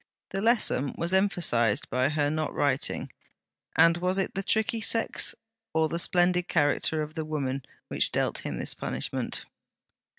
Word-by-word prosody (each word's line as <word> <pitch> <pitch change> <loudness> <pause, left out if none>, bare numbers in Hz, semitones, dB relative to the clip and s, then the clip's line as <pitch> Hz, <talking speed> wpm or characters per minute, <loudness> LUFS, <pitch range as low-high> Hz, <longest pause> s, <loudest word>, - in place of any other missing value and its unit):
The 195 - -2
lesson 220 - +2
was 170 +2 0
emphasized 175 - +2
by 130 +2 +2
her 145 -1 0
not 155 0 -2
writing: 140 0 -1 0.6
and 170 0 +5
was 180 +2 0
it 195 - -1
the 195 - -2
tricky 220 +3 0
sex, 225 +2 +2 0.4
or 160 -1 +2
the 170 - -2
splendid 180 0 +2
character 155 0 +1
of 150 +1 -8
the 160 -1 -3
woman, 140 -4 -3 0.2
which - - 0
dealt - - -1
him - - -5
this - - -2
punishment? - - -4
160 Hz, 155 wpm, -27 LUFS, 145-190 Hz, 0.6 s, and